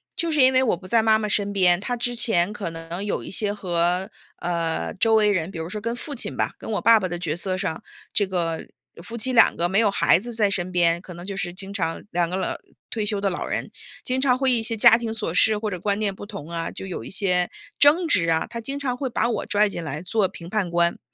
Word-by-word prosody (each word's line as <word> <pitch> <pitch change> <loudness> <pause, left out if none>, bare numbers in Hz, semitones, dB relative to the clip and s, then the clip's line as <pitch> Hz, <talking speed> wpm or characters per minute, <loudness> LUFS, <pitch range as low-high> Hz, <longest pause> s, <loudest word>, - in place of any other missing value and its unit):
就 335 -2 -1
是 300 -3 +3
因 260 0 +6
为 260 - +4
我 225 -8 +1
不 185 - -15
在 230 +3 +3
妈 220 -1 +4
妈 215 - -2
身 205 -1 0
边， 180 -3 +4
她 245 +5 -3
之 245 +1 -2
前 210 -5 +1
可 205 -4 -4
能 165 +3 -6
有 205 - -2
一 - - -8
些 205 +1 +1
和， 180 -1 0 0.3
呃， 165 - -2
周 225 -1 +3
围 210 -1 +4
人， 180 -4 -1
比 175 - -8
如 160 - -4
说 210 +2 -5
跟 230 +2 -3
父 285 +4 -5
亲 245 - -2
吧， - - -1
跟 - - -8
我 205 - -1
爸 230 0 +6
爸 190 - -2
的 175 -1 -4
角 160 -3 -2
色 185 +1 -2
上， 185 -5 -3 0.3
这 205 - +2
个 170 -3 -2 0.4
夫 235 +3 -7
妻 255 +3 +1
2 225 - +6
个 175 - +1
没 195 - +2
有 220 -2 +4
孩 195 - +4
子 240 +3 -5
在 215 -3 +2
身 185 -2 -1
边， 170 -1 +2
可 180 - -10
能 175 +1 -9
就 195 0 -5
是 180 -2 -2
经 195 +1 -6
常 165 -5 -2
2 175 -1 0
个 185 - -3
老 190 - -2 0.4
退 220 -3 -2
休 205 -1 0
的 200 - +1
老 180 - -4
人， - - -3 0.3
经 255 +1 0
常 255 -2 +3
会 265 -1 +3
一 235 - +3
些 225 0 +1
家 220 +1 +7
庭 235 -2 -4
琐 215 -7 -3
事 215 +4 +4
或 210 0 -3
者 180 - -4
观 200 +2 -1
念 205 -2 0
不 205 - -9
同 200 -8 -9
啊， 165 -1 -3
就 - - -6
有 185 - -6
一 - - -9
些 180 -2 +2 0.3
争 315 +5 +5
执 175 - +2
啊。 160 0 +2
她 235 0 -6
经 275 +5 -3
常 260 -3 -2
会 265 0 -3
把 235 - 0
我 235 - -2
拽 210 +1 +2
进 170 - -5
来 150 0 -5
做 195 +2 +1
评 170 -2 -11
判 200 -3 -1
官， 170 0 +1
200 Hz, 285 characters per minute, -23 LUFS, 175-225 Hz, 0.4 s, 家